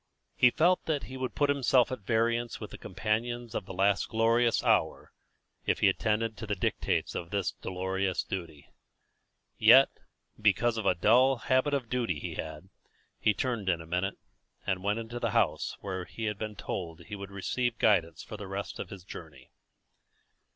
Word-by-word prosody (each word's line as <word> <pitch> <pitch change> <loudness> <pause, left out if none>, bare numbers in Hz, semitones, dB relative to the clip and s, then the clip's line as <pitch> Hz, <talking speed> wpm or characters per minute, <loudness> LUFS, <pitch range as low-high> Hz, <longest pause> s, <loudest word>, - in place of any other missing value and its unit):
He 125 - +6
felt 175 +8 +3
that 150 -3 -1
he 130 - -8
would 130 -1 -4
put 145 -1 +3
himself 130 -3 +3
at 130 - -3
variance 115 +3 0
with 105 - -7
the - - -8
companions 110 +4 -2
of 95 - -4
the - - -6
last 100 +1 +2
glorious 115 +1 +3
hour - - +1 0.6
if - - +1
he - - +6
attended 110 +1 0
to 110 - -6
the 105 - -1
dictates 90 - -1
of 85 - -5
this 100 -2 -1
dolorous 95 0 -2
duty. 80 -6 -7 0.9
Yet, - - +8 0.5
because 110 +3 +3
of 110 - -2
a 90 - +4
dull 125 +9 +5
habit 130 +4 +1
of 130 -4 -2
duty 115 -9 -1
he - - -5
had, 80 +3 -7 0.5
he 105 - +2
turned 115 -4 -1
in 85 -2 +1
a 80 - -9
minute, 90 +4 -1 0.5
and 95 -1 -1
went 105 +2 +1
into 115 +1 -5
the - - 0
house - - +1
where 95 -2 -4
he 115 - -8
had 105 -2 -2
been 110 -1 -4
told 85 -5 -5
he 85 +5 -8
would 100 -1 -7
receive 120 +5 -2
guidance 85 -9 +2
for 110 - -8
the 105 - -7
rest 100 +1 -5
of 90 - -5
his 95 -3 -9
journey. 80 -7 -11
105 Hz, 180 wpm, -30 LUFS, 95-120 Hz, 0.9 s, Yet